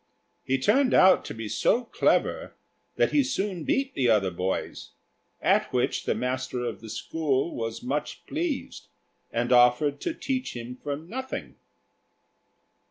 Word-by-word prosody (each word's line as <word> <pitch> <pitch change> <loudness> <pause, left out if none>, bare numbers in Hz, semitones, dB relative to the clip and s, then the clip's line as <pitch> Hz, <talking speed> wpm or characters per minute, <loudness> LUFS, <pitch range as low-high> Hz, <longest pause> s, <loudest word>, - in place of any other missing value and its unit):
He 135 0 +1
turned 255 - +3
out 185 0 +6
to - - -5
be 115 -1 -5
so 240 - +2
clever 230 - 0 0.4
that - - +2
he 290 - +4
soon 195 - -2
beat 270 0 0
the 125 -3 +1
other 100 -4 +3
boys; 90 +2 -3 0.5
at - - +3
which - - 0
the - - +1
master 125 0 -2
of 115 -2 -5
the 115 - -9
school 140 +6 -1
was 115 -1 -4
much 145 +4 -3
pleased, 315 -2 -3 0.4
and 120 +2 -1
offered 125 +4 +4
to 335 - -2
teach 260 - -3
him 120 +1 -6
for 145 -1 -2
nothing. 250 - -6
140 Hz, 145 wpm, -27 LUFS, -, 0.5 s, out